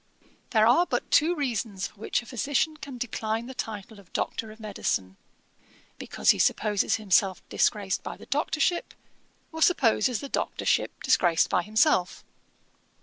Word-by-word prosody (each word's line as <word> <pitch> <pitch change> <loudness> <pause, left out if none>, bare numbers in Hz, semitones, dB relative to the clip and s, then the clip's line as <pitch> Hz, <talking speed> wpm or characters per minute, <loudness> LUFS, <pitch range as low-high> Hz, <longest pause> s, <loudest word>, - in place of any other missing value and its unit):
'There 220 -2 +4
are 295 +10 +4
but - - -2
two 330 +4 +4
reasons 230 - -2
for 205 - -10
which 225 - -1
a - - -16
physician 280 +6 -1
can 285 -4 -9
decline 225 -1 -3
the 260 - -8
title 215 -3 -6
of 190 -3 -19
Doctor 220 - -3
of 215 +1 -13
Medicine, 145 - -3 0.8
because - - +2
he - - -2
supposes 210 -2 +2
himself 195 -3 +1
disgraced 200 -2 0
by - - -7
the - - -13
doctorship, 310 +4 -1 0.6
or 320 0 -7
supposes 250 -8 +3
the 280 - -6
doctorship - - 0
disgraced 170 -2 +3
by - - +3
himself. 210 - +1
225 Hz, 145 wpm, -27 LUFS, 205-275 Hz, 0.8 s, There